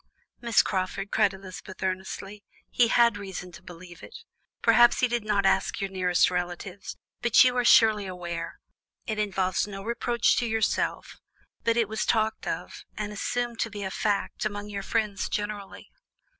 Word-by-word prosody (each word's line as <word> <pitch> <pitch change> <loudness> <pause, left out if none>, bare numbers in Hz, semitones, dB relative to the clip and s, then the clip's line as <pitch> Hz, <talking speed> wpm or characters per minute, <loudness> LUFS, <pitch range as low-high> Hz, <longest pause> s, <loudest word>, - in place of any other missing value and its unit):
"Miss 235 -3 +3
Crawford!" 190 +1 -3
cried 210 -3 +3
Elizabeth 190 0 -10
earnestly; 190 +2 -4 0.3
"he 240 - +4
had 235 -2 +4
reason 190 -2 -7
to 180 - -13
believe 175 -1 -12
it. - - -10 0.5
Perhaps 240 0 +5
he 250 - +4
did 240 -2 -2
not 205 -2 +1
ask 195 +3 +2
your 195 -1 -3
nearest 180 -2 +2
relatives, 180 +2 -5 0.2
but 240 +1 +6
you 250 -1 +2
are 245 - +2
surely 220 -4 +5
aware 170 -2 -6 0.5
it 215 -1 -3
involves 190 -3 0
no 195 -1 -7
reproach 235 +1 +1
to 240 - +1
yourself 220 -1 -1 0.4
but 230 0 +1
it 230 -3 +2
was 220 +1 -2
talked 220 -1 0
of, - - -5
and 210 0 -4
assumed 240 +3 -2
to 230 - 0
be 205 -1 -6
a 190 - -4
fact, 205 0 -1
among 205 -1 -4
your 200 -1 -4
friends 210 -1 -1
generally?" 205 -1 -5
205 Hz, 165 wpm, -27 LUFS, 190-225 Hz, 0.5 s, but